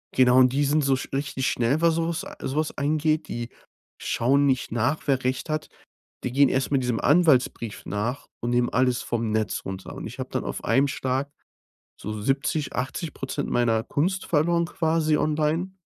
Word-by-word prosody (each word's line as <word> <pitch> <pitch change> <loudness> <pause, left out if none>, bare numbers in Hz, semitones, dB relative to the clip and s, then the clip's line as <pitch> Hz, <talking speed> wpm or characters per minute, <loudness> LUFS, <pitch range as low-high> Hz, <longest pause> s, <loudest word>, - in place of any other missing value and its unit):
genau 125 0 +5
und 130 0 +6
die 145 +1 +2
sind 145 +1 +2
so 135 -1 +3
sch - - -6
richtig 135 -1 -1
schnell, 125 +7 +1
was 165 -1 +4
so 165 0 0
was 170 - -2 0.2
so 135 - -3
was 155 0 -1
angeht. 155 +2 +1
Die 120 0 -5 0.5
schauen 140 +4 +2
nicht 130 -4 0
nach, 125 +6 0
wer 130 -2 +1
Recht 130 +5 -2
hat. 155 0 -2 0.6
Die 125 - -2
gehen 140 0 +5
erst 130 +2 0
mal 140 - +3
diesem 125 -3 -1
Anwaltsbrief 140 -8 +2
nach 115 +7 -3
und 120 - -2
nehmen 120 0 +2
alles 125 0 +1
vom 115 -2 -2
Netz 110 -1 -1
runter. 95 0 -6
Und - - -7
ich - - -8
habe - - -5
dann - - -2
auf - - -5
einem 140 +1 +3
Schlag 135 +2 -2 0.7
so 105 0 -5
70, 140 +4 -1
80% 135 +2 -4
meiner 115 -2 +2
Kunst 185 +6 -1
verloren 170 +2 +2
quasi 160 -3 +1
online. 155 +4 0
135 Hz, 185 wpm, -25 LUFS, 125-155 Hz, 0.7 s, und